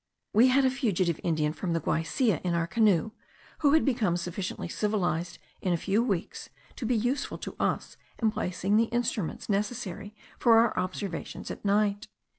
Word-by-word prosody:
We 230 +5 +6
had 265 +1 +4
a 260 - +3
fugitive 190 - 0
Indian 155 -2 +1
from 175 0 -3
the 165 - +1
Guaisia 165 - 0
in 175 -2 0
our 170 -1 +1
canoe, 215 0 +2 0.5
who 290 -2 +4
had 315 - +4
become 225 -10 +1
sufficiently 180 +1 -4
civilized 175 -4 -1 0.2
in 185 - +1
a - - +2
few 200 +7 +1
weeks 195 -8 -3 0.3
to 235 - -3
be 250 - +2
useful 245 +5 -1
to - - -7
us - - -1 0.2
in 220 -2 +2
placing 195 +1 0
the 230 - +4
instruments 230 -7 -2
necessary 205 -1 -3 0.2
for 230 -2 +6
our 230 0 +4
observations 185 -1 -4
at - - -8
night. 205 +1 +1
205 Hz, 170 wpm, -28 LUFS, 175-230 Hz, 0.5 s, We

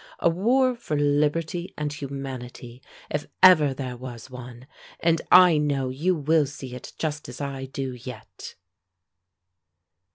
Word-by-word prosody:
A 170 - +2
war 250 +8 +2
for 230 -11 -3
liberty, 150 +4 0
and 150 -1 -2
humanity, 130 -3 -7 0.3
if 150 - -2 0.2
ever 155 -6 +8
there 130 -2 -5
was 125 0 -9
one. 125 0 -10 0.3
And 165 -1 +2
I 180 -4 +8
know 140 -3 0
you 160 +8 0
will 155 -1 +2
see 135 -2 -9
it 125 - -9
just 150 -4 -3
as 125 - -9
I 135 -2 -4
do, 135 0 -5
yet." 125 -2 -10
145 Hz, 135 wpm, -25 LUFS, 130-160 Hz, 0.3 s, ever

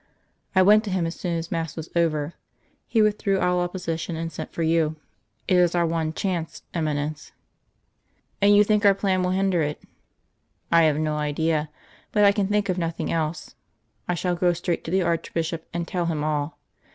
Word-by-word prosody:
"I 185 - +6
went 210 +3 +6
to - - -3
him 185 -3 0
as 165 - -3
soon 175 -2 -3
as 165 +1 -5
mass 165 -4 -2
was 160 -1 -7
over. 160 -2 +1 0.5
He 220 -2 +3
withdrew 205 -2 +1
all 180 0 +2
opposition, 175 -2 -3
and 165 0 -4
sent - - -7
for 165 - -3
you. 160 -1 +2 0.5
It 185 - +4
is 175 -1 +3
our 170 -1 +3
one 165 -1 -1
chance, 170 -1 -3
Eminence." 150 -2 -2 1.1
"And 205 +1 +6
you 205 - +7
think 210 0 +2
our 200 -1 +6
plan 190 -2 +1
will 180 - 0
hinder 190 -2 +1
it?" 150 0 -2 0.9
"I 165 -1 +6
have 150 -2 +2
no 155 -1 -1
idea, 150 +1 0 0.4
but 210 - +3
I 200 - +7
can 200 -1 0
think 205 0 +1
of 185 -1 -1
nothing 165 -1 -2
else. 155 -1 -2 0.5
I 180 - 0
shall 180 +1 -1
go 175 0 +2
straight 175 0 -2
to - - -4
the 190 +2 +2
Archbishop 165 -1 -2
and 170 0 -3
tell 175 -2 -1
him 155 -3 -1
all. 150 -1 -2
170 Hz, 190 wpm, -24 LUFS, 160-185 Hz, 1.1 s, you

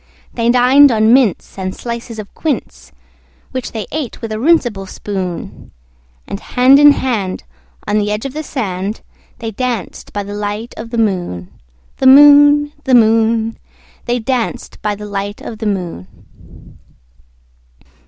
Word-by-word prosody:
They 230 -1 0
dined 255 +3 +6
on 220 0 +3
mince 245 -6 +1
and 185 0 -4
slices 235 -1 -6
of 215 -2 -9
quince, 310 -3 -4 0.6
Which 255 -1 -5
they 220 -2 -5
ate 300 -5 -4
with 225 -2 -6
a 215 - -3
runcible 240 - +1
spoon; 185 -4 -6 0.6
And 200 - -6
hand 255 +5 +4
in 290 0 +8
hand, 215 -10 -2 0.4
on 210 +1 +1
the 205 0 -1
edge 210 +4 -3
of 270 - -5
the 310 - -4
sand, 205 -8 -4 0.4
They 230 -2 -5
danced 240 -3 -4
by 205 - -3
the 200 +1 -8
light 210 +3 -4
of 225 +1 -8
the 235 - -4
moon, 175 - -2 0.5
The 265 - +2
moon, 290 +1 +7
The 260 -2 +4
moon, 225 0 +2 0.5
They 240 +1 0
danced 245 0 -3
by 210 -1 -1
the 210 +1 -9
light 205 0 -5
of 220 - -8
the 220 - -3
moon. 175 - -4
225 Hz, 150 wpm, -16 LUFS, 205-255 Hz, 0.6 s, in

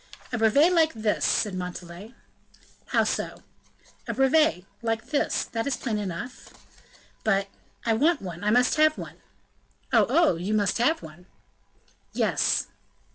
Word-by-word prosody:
"A - - 0
brevet 280 +11 +4
like 320 -2 +3
this," 220 -1 -1
said 210 -3 +1
Montalais. 180 +4 -7 0.7
"How - - +2
so?" - - -3 0.6
"A - - -3
brevet 270 - +3 0.2
like 225 +2 -3
this; 290 - +1
that 225 +2 -4
is 275 - -1
plain 220 -5 -2
enough." 205 +6 -6 0.7
"But 200 -2 +1 0.2
" - - -30
"I 230 - +2
want 300 +8 +2
one 180 -2 -8
I 210 - +1
must 245 +5 +3
have 310 0 +4
one!" - - -8 0.8
"Oh! - - +5
oh! 330 - +4
you 195 +5 -2
must 205 +1 +1
have 315 +7 +2
one!" 165 +4 -13 0.9
"Yes." - - +1
225 Hz, 145 wpm, -26 LUFS, 195-280 Hz, 0.9 s, Oh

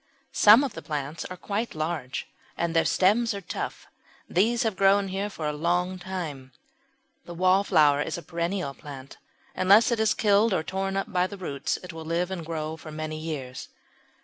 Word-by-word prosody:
Some 215 +6 +7
of 265 -6 -3
the - - -7
plants 150 +1 -4
are 185 - -7
quite 205 +4 -3
large 155 -5 -3 0.3
and 170 0 -1
their 165 - +4
stems 215 +4 +3
are - - -4
tough. - - -5 0.4
These 225 +6 +2
have 220 -4 0
grown 195 +1 +3
here 195 +2 -2
for 165 -6 -6
a 150 - -1
long 175 +4 0
time. 155 -9 -6 0.7
The 175 - -8
Wallflower 170 -6 +4
is - - -3
a 170 - -8
perennial 170 -2 -2
plant; 135 -2 -11 0.3
unless 200 +6 +5
it 235 - +1
is 220 -1 +2
killed 210 0 +3
or 160 - 0
torn 195 +2 -2
up 195 +1 -3
by 180 0 +2
the 200 - -9
roots 145 -6 -3
it 180 -2 -8
will 160 0 -7
live 170 +3 -1
and 180 -3 -4
grow 160 -1 -4
for 155 - -10
many 155 0 -5
years. 140 -5 -6
180 Hz, 185 wpm, -26 LUFS, 155-195 Hz, 0.7 s, Some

